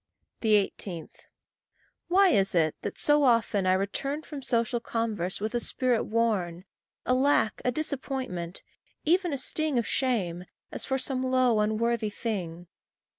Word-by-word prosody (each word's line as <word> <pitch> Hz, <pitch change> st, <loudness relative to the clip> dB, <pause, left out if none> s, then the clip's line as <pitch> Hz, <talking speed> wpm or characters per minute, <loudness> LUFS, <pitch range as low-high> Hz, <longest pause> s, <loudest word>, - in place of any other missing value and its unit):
18. 200 Hz, -5 st, 0 dB, 1.0 s
Why 380 Hz, +2 st, +5 dB
is 195 Hz, -, +2 dB
it 155 Hz, -2 st, +3 dB
that -, -, -5 dB
so 295 Hz, 0 st, +3 dB
often 230 Hz, -6 st, +2 dB
I 185 Hz, -, +5 dB
return 275 Hz, +10 st, -2 dB
From 290 Hz, -3 st, -7 dB
social 235 Hz, -1 st, 0 dB
converse 220 Hz, -6 st, -2 dB
with 215 Hz, +3 st, -3 dB
a 240 Hz, -, +1 dB
spirit 245 Hz, -1 st, +1 dB
worn, 200 Hz, -6 st, 0 dB, 0.4 s
A 250 Hz, -, +2 dB
lack, 260 Hz, -4 st, +2 dB
a 250 Hz, -, +1 dB
disappointment 260 Hz, -, -3 dB, 0.4 s
even 350 Hz, +2 st, +2 dB
a 280 Hz, -, -1 dB
sting 305 Hz, +1 st, 0 dB
Of 235 Hz, -, +1 dB
shame, 190 Hz, -11 st, -1 dB, 0.3 s
as -, -, -3 dB
for 265 Hz, -, 0 dB
some 260 Hz, 0 st, -2 dB
low, 255 Hz, -3 st, +2 dB
unworthy 220 Hz, +1 st, +1 dB
thing? 180 Hz, -6 st, -4 dB
230 Hz, 140 wpm, -28 LUFS, 195-265 Hz, 1.0 s, Why